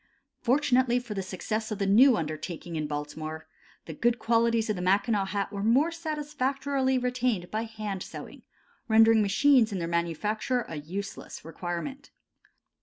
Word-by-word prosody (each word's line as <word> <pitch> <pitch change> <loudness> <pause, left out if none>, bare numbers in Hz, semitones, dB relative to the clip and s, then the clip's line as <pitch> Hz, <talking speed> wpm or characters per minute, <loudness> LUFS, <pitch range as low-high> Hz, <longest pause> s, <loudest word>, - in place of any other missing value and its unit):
Fortunately 250 -1 +3
for 245 -3 -7
the 195 - -2
success 215 +4 -3
of 215 - -3
the 200 - -1
new 230 +5 +6
undertaking 160 +2 -5
in 155 -1 -2
Baltimore, 155 +2 -5 0.4
the 160 - -7
good 235 +9 +1
qualities 230 -1 +2
of 215 - 0
the 180 - -4
Mackinaw 200 +2 +2
hat 200 +1 -3
were 200 - -3
more 260 +10 +3
satisfactorily 285 -4 -1
retained 250 -7 -1
by 220 +1 -1
hand 215 -4 -5
sewing, - - -9 0.5
rendering 225 0 +6
machines 230 +3 +4
in 195 - -2
their 170 -2 -2
manufacture 170 - -1
a 160 - -6
useless 185 +3 -7
requirement. 175 - -5
215 Hz, 150 wpm, -28 LUFS, 180-250 Hz, 0.5 s, new